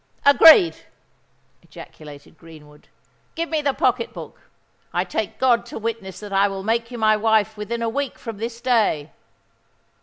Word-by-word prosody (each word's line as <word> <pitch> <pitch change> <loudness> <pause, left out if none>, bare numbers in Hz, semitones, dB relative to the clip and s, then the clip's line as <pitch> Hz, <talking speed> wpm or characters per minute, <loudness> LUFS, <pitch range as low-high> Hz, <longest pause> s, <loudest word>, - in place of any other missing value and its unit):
"Agreed!" 325 +5 +7 0.8
ejaculated 145 -1 -14
Greenwood. 150 -3 -17 0.5
"Give 335 0 -3
me 315 -2 -1
the 280 -2 -1
pocket 245 -2 0
book—I - - -8
take - - -4
God 240 -3 +2
to - - -8
witness 215 -5 -5
that 205 -1 -8
I 195 +1 +3
will 195 -1 -6
make 230 +2 -1
you 245 - -8
my 215 -1 +3
wife 220 0 +1
within 230 +3 -5
a - - -1
week 280 +3 -4
from 225 -3 -8
this 230 +1 -6
day." 220 - 0
225 Hz, 150 wpm, -21 LUFS, 195-245 Hz, 0.8 s, Agreed